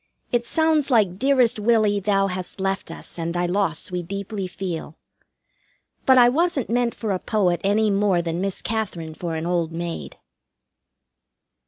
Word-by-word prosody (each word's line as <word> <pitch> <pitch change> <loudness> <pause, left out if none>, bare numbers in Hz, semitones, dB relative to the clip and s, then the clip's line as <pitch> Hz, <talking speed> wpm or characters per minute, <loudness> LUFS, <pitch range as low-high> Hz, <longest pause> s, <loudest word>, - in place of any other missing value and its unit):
It 240 -1 0
sounds 315 -3 +2
like 205 -7 +2
"Dearest 260 -4 +3
Willie, 215 -2 +3
thou 195 0 +2
hast 185 0 -4
left 195 +1 -2
us, - - -8
and 170 +1 -3
thy 175 0 +1
loss 180 -2 -1
we 180 0 -2
deeply 195 +2 -5
feel." 175 -4 -5 1.1
But 260 -1 +7
I 245 -1 +8
wasn't 295 -1 +1
meant 240 0 +1
for 220 -3 -3
a 185 - 0
poet 180 -6 +1
any 210 +2 +2
more 195 -2 +2
than 170 0 -2
Miss 195 -1 -3
Katherine 190 -8 -3
for 165 0 -4
an 160 +1 -3
old 170 -2 0
maid. 170 0 -5
195 Hz, 160 wpm, -23 LUFS, 175-225 Hz, 1.1 s, I